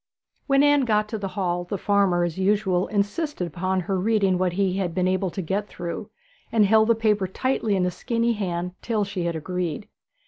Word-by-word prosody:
When 275 0 +4
Anne 290 -2 +4
got 215 -2 +2
to 220 - -4
the 195 - -3
hall 175 -2 0
the 190 +3 -4
farmer, 195 -3 +2
as 170 -2 -2
usual, 190 -2 +1
insisted 205 - -1
upon 185 +3 -1
her 190 +1 -1
reading 195 -2 +2
what 180 -1 +1
he 190 0 0
had 180 -4 -2
been 185 -1 +1
unable 185 0 +1
to 190 +2 -5
get 200 +5 -2
through, 170 -4 -6 0.4
and 220 -2 +4
held 220 +2 +4
the 230 - +4
paper 210 -3 +1
tightly 225 +1 0
in 185 - +1
his 180 0 0
skinny 235 +4 0
hand 180 -4 -3
till 220 -3 0
she 195 -3 -3
had 170 -1 -1
agreed. 180 +2 -3
195 Hz, 205 wpm, -24 LUFS, 180-215 Hz, 0.4 s, When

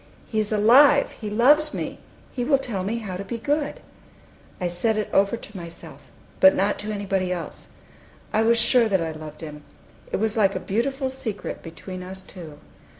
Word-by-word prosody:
"He 220 - -2
is 215 0 0
alive! 255 +7 +6
He 215 - -7
loves 295 +8 +4
me! - - -4 0.3
He 245 - -3
will 275 +2 +3
tell 230 -8 -4
me 215 +5 -2
how 200 -5 -5
to 195 - -5
be 215 +4 -5
good!" 290 +5 -1 0.8
I 180 - -1
said 195 +6 0
it 215 - -2
over 200 +4 +3
to 215 - -11
myself, 170 -2 -10 0.3
but 285 0 +7
not 200 +2 +1
to 215 +1 -4
anybody 195 -3 -1
else. 175 -2 -6 0.7
I 215 - +3
was 230 +1 +4
sure 230 0 +4
that 190 -4 +2
I 160 - -3
loved 155 0 -9
Him. 150 -2 -8 0.5
It - - 0
was 220 +1 0
like 200 -2 +3
a - - -1
beautiful 260 +7 -1
secret 255 -6 -5
between 185 +2 -8
us 190 +1 -8
two. 165 -6 -11
210 Hz, 190 wpm, -24 LUFS, 185-235 Hz, 0.8 s, but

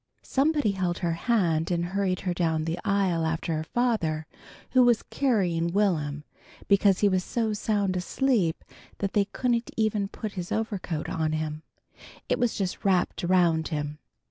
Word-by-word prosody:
Somebody 290 -4 +2
held 185 -2 -1
her 170 - +1
hand 165 -5 +1
and 170 -1 0
hurried 195 -2 0
her 180 -2 -1
down 160 -3 0
the 165 +1 -2
aisle 190 -4 +1
after 160 0 -1
her 155 - -2
father, 165 -8 0 0.5
who 255 - +5
was 240 -2 +4
carrying 180 -11 0
Will'm, 155 -8 0 0.4
because 200 -1 +4
he 205 - +5
was 185 -2 +1
so 225 0 -1
sound 205 -2 0
asleep 185 -2 0 0.3
that 200 -1 -2
they 205 -2 +3
couldn't 235 +2 -1
even 215 -2 +1
put 215 +1 -6
his 180 -3 -6
overcoat 200 -8 -2
on 155 -1 -1
him. 155 -1 -3 0.7
It - - 0
was 245 -2 +1
just 190 +1 -3
wrapped 185 -4 +1
around 170 -3 +3
him. 150 -1 -4
185 Hz, 160 wpm, -27 LUFS, 165-215 Hz, 0.7 s, who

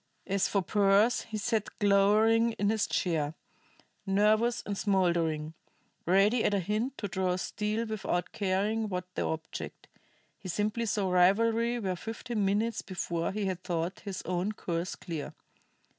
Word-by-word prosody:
As 195 0 +1
for 200 -2 0
Pearse, 205 +4 +3
he 220 - -3
sat 220 0 -2
glowering 215 +3 +4
in 205 -1 +1
his 220 -1 +1
chair, 160 -4 -1 0.7
nervous 215 +4 +3
and 205 - -3
smoldering; 170 -6 +1 0.5
ready 200 +6 +4
at 205 - +2
a - - +2
hint 215 +8 -2
to 205 - -3
draw 185 -1 0
steel 210 +4 -2
without 210 -5 -2
caring 210 +2 0
what 180 -1 -5
the - - -2
object. 160 0 -5 0.5
He 185 - -8
simply 210 +5 -1
saw 195 -2 0
rivalry 225 +6 +3
where 190 -5 -2
fifteen 225 +2 -4
minutes 210 +4 +1
before 170 -3 -3
he 205 +1 -2
had 185 -2 -3
thought 170 +1 -2
his 200 -3 -6
own 180 +4 -1
course 170 -3 -3
clear. 165 -5 -6
200 Hz, 145 wpm, -30 LUFS, 180-220 Hz, 0.7 s, glowering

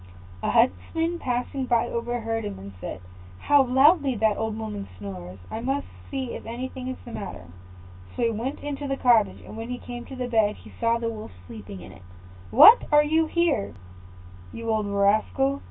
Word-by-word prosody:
A - - -1
huntsman 325 - +1
passing 250 +1 -2
by 240 -2 +2
overheard 235 -1 -2
him, 205 -1 -5
and 100 +1 -10
said, 95 - -6 0.4
"How 285 - +4
loudly 270 +2 +4
that 220 -1 +2
old 220 0 -3
woman 210 -2 -5
snores! 95 -2 -8
I 220 - -3
must 270 +4 -1 0.2
see 265 -3 -3
if - - -7
anything 255 +2 -5
is 260 - -4
the 240 - -9
matter." 195 - -7 0.7
So - - -1
he 230 - +3
went 235 +6 -4
into 290 0 -4
the 275 0 -1
cottage; 235 -5 +3
and - - -11
when 225 +1 -6
he 250 - -3
came 245 -1 -8
to 265 - -9
the 250 -1 -3
bed, 220 -3 +2
he - - -14
saw 230 0 +2
the 230 0 -2
Wolf 215 - -8
sleeping 100 -2 -9
in - - -11
it. - - -15 0.5
"What! 455 - +9
are 295 0 +7
you 320 +2 +2
here, 335 - 0 0.8
you 230 0 -4
old 215 -2 0
rascal? 215 +7 +2
235 Hz, 185 wpm, -25 LUFS, 210-270 Hz, 0.8 s, What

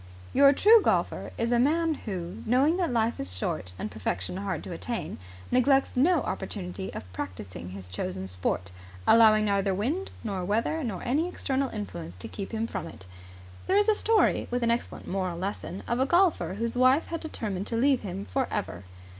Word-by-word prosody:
Your 275 0 +7
true 430 +10 +6
golfer - - 0
is 230 +1 0
a 240 - +4
man 320 +5 +3
who, 190 - -6
knowing 275 +8 +3
that 350 -6 0
life 230 0 +1
is 90 0 -1
short 90 0 -3
and 105 +3 -4
perfection 95 - -3
hard 190 -4 -3
to - - -7
attain, 230 +7 -4 0.3
neglects 270 +2 +3
no 310 +5 +4
opportunity 190 -1 -4
of 90 0 -8
practising 90 -1 -6
his 95 0 -9
chosen 95 +1 -4
sport, 90 0 -2 0.3
allowing 215 -2 +6
neither 200 -1 +1
wind 295 - -1
nor 195 -5 -3
weather 230 - 0
nor 210 -8 -4
any 295 +8 +1
external 275 -6 -1
influence 90 - -6
to 90 - -7
keep 200 -2 -6
him 225 0 -1
from - - -5
it. 95 - -12 0.6
There 385 - +3
is 415 +1 +4
a - - +6
story, 440 +1 +2
with 245 0 -1
an 230 - +3
excellent 235 - -3
moral 185 -2 -2
lesson, 190 0 -4
of 235 - 0
a 265 - +2
golfer 345 - +3
whose 230 +3 -2
wife 255 +5 +4
had 330 - -3
determined 210 - -4
to 230 - -2
leave 270 +2 +3
him 195 0 -5
for 265 -2 -1
ever. 90 +2 -4
225 Hz, 190 wpm, -28 LUFS, 180-270 Hz, 0.6 s, Your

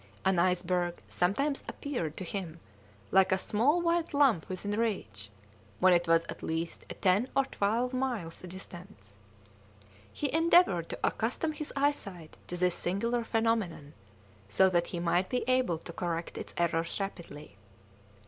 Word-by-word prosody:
An 190 -2 +3
iceberg 180 -1 +1
sometimes 275 +11 0
appeared 205 - -4
to - - -4
him 175 -3 -5 0.5
like 190 -1 +5
a 190 - +4
small 250 - +2
white 335 -2 +1
lump 270 - +3
within 190 +2 -4
reach, 110 - -2 0.5
when 185 -1 +6
it 175 0 +2
was 165 0 +4
at - - -8
least 165 +1 -4
at - - -9
ten 200 +7 +3
or 275 - +4
twelve 235 +2 0
miles' 245 -10 -2
distance. 175 - -10 1.0
He 285 - -3
endeavoured 325 - +4
to - - -5
accustom 255 +8 0
his 305 -1 -6
eyesight 200 - -1
to 180 - -4
this 180 0 +2
singular 230 +8 -1
phenomenon, 225 -10 -1 0.6
so 190 - +4
that 175 -1 +2
he 175 - -4
might 175 +2 +1
be 250 - 0
able 255 -9 +2
to 170 +1 -9
correct 170 -1 -3
its - - -7
errors 170 +1 0
rapidly. 150 - -7
185 Hz, 150 wpm, -30 LUFS, 170-245 Hz, 1.0 s, when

